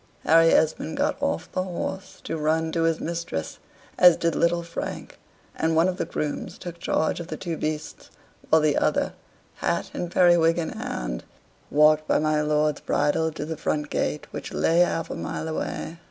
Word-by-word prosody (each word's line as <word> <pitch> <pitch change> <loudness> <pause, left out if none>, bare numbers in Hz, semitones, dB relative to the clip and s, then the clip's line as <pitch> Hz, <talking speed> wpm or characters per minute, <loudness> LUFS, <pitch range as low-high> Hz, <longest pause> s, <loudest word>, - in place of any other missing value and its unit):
Harry 165 +1 +6
Esmond 160 0 +1
got 290 +1 +1
off 285 0 -2
the 185 - -1
horse 190 +1 -5
to - - -3
run 160 +1 0
to 165 - 0
his 165 -1 +1
mistress, 165 - -4 0.4
as 180 -2 +8
did 170 -1 0
little 170 0 +2
Frank, 170 0 -6 0.4
and 160 0 0
one 165 +3 +4
of 185 -1 -2
the - - -1
grooms 150 -1 -4
took 175 -1 -8
charge 160 -2 0
of 170 - -6
the - - -5
two 170 -3 -4
beasts, 155 0 -4 0.4
while 160 - +5
the 150 -2 +3
other, - - +1 0.4
hat - - -1
and 175 - -3
periwig 175 -2 +4
in 165 -2 -1
hand, - - -4 0.5
walked 155 +1 +4
by - - +3
my 155 0 +1
lord's 150 0 +1
bridle 155 +2 +1
to 150 -1 -5
the 160 +1 -4
front 150 -1 -2
gate, 150 - -1
which - - -6
lay 165 +1 +2
half 170 -2 +1
a - - -3
mile 160 - -4
away. 160 +1 -4
160 Hz, 185 wpm, -25 LUFS, 155-170 Hz, 0.5 s, as